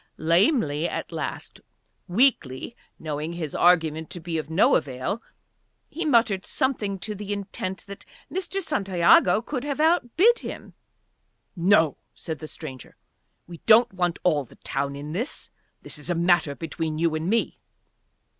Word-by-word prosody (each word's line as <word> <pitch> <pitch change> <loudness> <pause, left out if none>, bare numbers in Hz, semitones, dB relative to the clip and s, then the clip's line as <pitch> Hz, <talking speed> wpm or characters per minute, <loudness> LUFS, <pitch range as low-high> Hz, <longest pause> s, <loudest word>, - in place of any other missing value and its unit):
Lamely 170 - +2
at - - -5
last, - - -5 0.5
weakly, 195 - +1 0.2
knowing 155 +1 -4
his 160 -4 -5
argument 160 -3 +3
to 175 - -7
be 165 -1 -3
of 155 - -6
no 165 +5 +4
avail, 140 - -2 0.7
he 335 +2 -4
muttered 230 -9 +3
something 215 -7 -1
to 210 +3 -5
the 205 0 -6
intent 195 -1 -4
that 200 0 -9 0.3
Mr. 385 +1 -2
Santiago 195 - +3
could 260 0 -4
have 285 0 -3
outbid 340 - +4
him. - - -8 0.8
"No," 170 -5 +3 0.2
said 160 -2 -6
the 155 - -7
stranger. 135 -6 -9 0.5
"We 170 -2 -11
don't 230 +1 +6
want 175 -2 0
all 155 -5 +2
the 125 - -17
town 140 +1 -3
in 145 +2 -7
this. 230 - -4 0.3
This - - -6
is 150 - -5
a 175 - +1
matter 170 -4 +2
between 160 -1 -4
you 165 0 +1
and 155 +3 -2
me." 230 +2 0
175 Hz, 145 wpm, -25 LUFS, 160-225 Hz, 0.8 s, don't